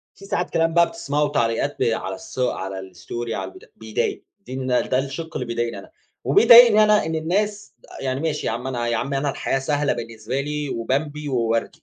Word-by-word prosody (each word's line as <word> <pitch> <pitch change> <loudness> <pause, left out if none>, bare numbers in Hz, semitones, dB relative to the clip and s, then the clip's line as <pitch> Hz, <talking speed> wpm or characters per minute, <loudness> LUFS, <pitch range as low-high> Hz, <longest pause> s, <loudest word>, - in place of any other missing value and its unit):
في 195 - -14
ساعات 180 -2 -2
كلام 165 0 +1
بقى 170 0 +5
بتسمعه 150 -9 -1
وتعليقات 120 -6 0
ب - - +2
على - - 0
الص - - -11
على 95 -6 -2
الستوري 95 +6 -6
على 95 0 -4
البت - - -17
بيضايق، 110 -1 -3 0.2
دي 125 - -12
الن 130 0 -4 0.2
ده 130 - +2
الشِق 140 +5 -4
اللي 125 - -3
بيضايقني 120 0 -2
أنا، - - -12 0.3
وبيضايقني 235 - +8
أنا 210 -5 +3
إن 160 - -2
الناس 205 +6 -1 0.3
يعني 130 0 -2
ماشي 155 -1 -2
يا - - 0
عم 125 +2 -4
أنا 120 -2 -2
يا 120 - 0
عم 135 +5 -2
أنا 140 +1 0
الحياة 135 - -1
سهلة 145 +1 0
بالنسبة 115 +2 -4
لي 150 0 -3
وبمبي 145 +5 -2
ووردي. 115 -3 -1
135 Hz, 200 wpm, -22 LUFS, 120-160 Hz, 0.3 s, وبيضايقني